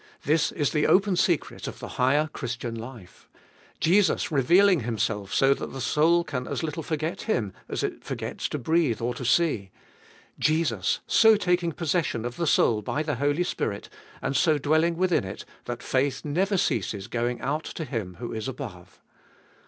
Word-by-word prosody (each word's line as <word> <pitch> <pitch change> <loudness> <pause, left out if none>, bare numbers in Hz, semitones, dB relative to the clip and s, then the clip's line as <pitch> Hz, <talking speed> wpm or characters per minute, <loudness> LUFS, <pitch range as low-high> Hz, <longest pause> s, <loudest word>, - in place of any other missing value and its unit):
This 155 +2 +2
Is 145 -3 0
the 150 -1 +2
open 195 0 +4
secret 175 -3 0
of - - -6
the - - -8
higher 135 +4 +2
Christian 120 -1 -4
life 115 -5 -10 0.5
Jesus 185 +1 +3
revealing 175 +7 +5
Himself 110 -4 -2
so 135 0 +4
that - - -7
the 135 - -6
soul 160 +6 +3
can 125 -6 -4
as - - -3
little 160 0 -3
forget 160 +4 -3
Him 105 - 0 0.2
as - - -2
it - - -3
forgets - - -4
to - - -3
breathe 155 -3 +1
or 120 +1 -1
to 125 - -7
see 125 - +2 0.7
Jesus 150 - +1
so 220 -1 +6
taking 180 -4 +1
possession 155 -8 -1
of 120 0 -5
the 170 - -1
soul 110 -6 +3
by 145 +8 -2
the 150 -4 -2
Holy 145 +5 +1
Spirit 100 - -3 0.3
and 140 - -1
so 155 -1 +3
dwelling 160 +4 +2
within 180 - +2
it, 95 +1 -7 0.2
that 120 -1 -5
faith 135 +2 0
never 190 +7 +1
ceases 100 - -1
going 120 +1 -2
out 150 +4 -2
to 160 - -5
Him 110 -10 -4
who 120 +4 -6
is 110 +1 -4
above. 115 -10 -8
145 Hz, 175 wpm, -26 LUFS, 120-165 Hz, 0.7 s, so